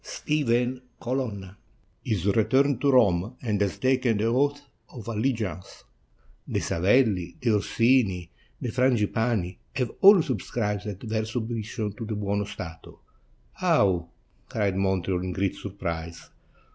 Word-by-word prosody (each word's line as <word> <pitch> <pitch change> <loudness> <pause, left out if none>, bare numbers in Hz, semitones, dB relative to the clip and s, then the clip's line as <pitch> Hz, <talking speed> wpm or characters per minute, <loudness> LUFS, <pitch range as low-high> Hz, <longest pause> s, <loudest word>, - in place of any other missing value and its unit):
Stephen 125 -4 0 0.2
Colonna 110 -7 -3 0.2
— - - -37
" - - -39
"Is 95 -5 0
returned 130 +6 +3
to 145 - +3
Rome, 105 -3 +3
and 105 -4 -1
has 100 -2 0
taken 130 -3 +2
the 105 - -1
oath 140 +5 +2 0.3
of 115 -4 -10
allegiance; 110 -4 -3 0.6
the - - -1
Savelli, 95 0 +2
the 120 - +1
Orsini, 105 -4 +2 0.3
the 120 - -3
Frangipani, 115 -6 +1 0.2
have 125 -4 -1
all 195 -3 +8
subscribed 105 -4 -3
their 110 0 -1
submission 110 -2 -3
to 115 +1 -7
the 110 0 -3
Buono 100 0 -1
Stato." 80 -5 -9 0.5
"How!" 90 -4 +2 0.4
cried 100 -3 0
Montreal 95 -2 0
in 90 0 -3
great 95 +1 0
surprise. 85 -4 -6
110 Hz, 130 wpm, -26 LUFS, 95-125 Hz, 0.6 s, all